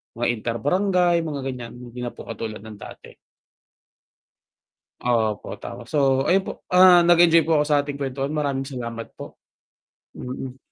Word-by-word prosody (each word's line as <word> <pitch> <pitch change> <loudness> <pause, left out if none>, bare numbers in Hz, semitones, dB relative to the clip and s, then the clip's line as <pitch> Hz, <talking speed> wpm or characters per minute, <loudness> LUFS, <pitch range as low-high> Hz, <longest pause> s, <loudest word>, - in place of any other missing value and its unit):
mga 120 - -1
inter 115 0 -3
barangay 180 +2 +2
mga, 155 -4 -4
ganyan, 120 -2 -8
hindi 120 0 -10
na 120 -1 -5
po - - -10
katulad 110 -2 -7
ng 110 -2 -11
dati. - - -11 2.0
Opo 110 -4 0
tapos, - - -8
so, 150 - +3 0.3
ayun 190 +1 +3
po, - - -4 0.2
ah, 180 -1 +8
nag 175 -1 +5
enjoy 165 -1 +5
po - - -3
ako 150 -1 +3
sa 145 - +5
ating 145 - -4
kwentuhan 135 +2 -3
maraming 140 -2 -1
salamat 115 -4 -6
po. - - -10 0.8
Mhm. 130 +1 -7
135 Hz, 155 wpm, -23 LUFS, 120-165 Hz, 2.0 s, ah